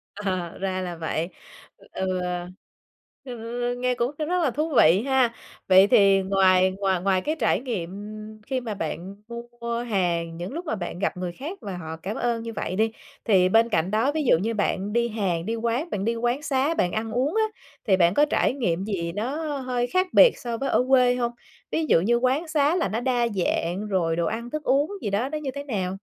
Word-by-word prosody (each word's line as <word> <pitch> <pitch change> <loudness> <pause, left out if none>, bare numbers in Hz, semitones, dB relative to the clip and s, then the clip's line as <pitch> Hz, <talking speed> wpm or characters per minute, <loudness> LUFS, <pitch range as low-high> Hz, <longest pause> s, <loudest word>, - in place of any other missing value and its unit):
Ờ, 185 -4 -3
ra 190 -1 -2
là 175 -2 -4
vậy. 165 +1 -2 0.6
Ừ, 185 -1 -2 1.0
hừm, 245 0 -4
nghe 250 0 +1
cũng 240 +2 0
r - - -4
rất 360 -1 +1
là 270 - +2
thú 305 +3 -2
vị 170 +6 +6
ha. 260 -3 +3 0.3
Vậy 190 +1 +7
thì 195 -1 +5
ngoài 190 -1 +4
ngoài 190 -3 +1
ngoài 190 -1 +2
cái 305 +8 -1
trải - - +2
nghiệm 220 -10 -4 0.6
khi 260 -2 -1
mà 225 -3 -4
bạn 180 +2 -5 0.4
mua 235 0 -2
hàng, 170 -7 -1
những 180 +9 -6
lúc 345 +2 -5
mà 300 - -1
bạn 175 -2 -5
gặp 190 - -1
người 180 -1 -3
khác 310 - -7
và 195 -3 -5
họ 160 -2 -6
cảm 205 +4 -3
ơn 235 -1 -1
như 230 - -6
vậy 185 - -3
đi, 220 +2 +1 0.3
thì 185 -5 +4
bên 225 +3 +4
cạnh 185 -3 0
đó, 225 +6 +2
ví 310 0 -1
dụ - - +6
như 220 +6 -1
bạn 205 -1 -1
đi 235 0 +2
hàng, 185 -6 -1
đi 225 - -1
quán, 235 +8 -1
bạn 200 - -2
đi 230 +1 +1
quán 240 +4 -1
xá, 280 +2 +1
bạn 180 - 0
ăn 220 +1 -3
uống 260 - 0
á, 440 - +3 0.4
thì 190 - +4
bạn 175 -1 +4
có 295 - +4
trải 300 - +1
nghiệm 190 -10 -1
gì 175 -5 -2
nó 290 +7 -2
hơi 250 -1 -1
khác 370 +4 +1
biệt - - +7
so 240 -3 -4
với 275 +3 -2
ở 250 - +2
quê 250 -2 +5
hông? 240 -1 -1 0.4
Ví 320 - 0
dụ 230 - +4
như 235 +5 +2
quán 260 +7 +1
xá 305 +1 +2
là 345 - 0
nó 215 +4 -1
đa 245 -2 +1
dạng, 185 0 -1
rồi 170 -5 0
đồ 170 - 0
ăn 235 +5 -3
thức 305 +3 -4
uống 285 +7 +2
gì 205 - -2
đó 220 +7 0
nó 305 - -3
như 280 -3 -4
thế 280 - -4
nào? 195 -8 -3
225 Hz, 220 wpm, -25 LUFS, 185-260 Hz, 1.0 s, Vậy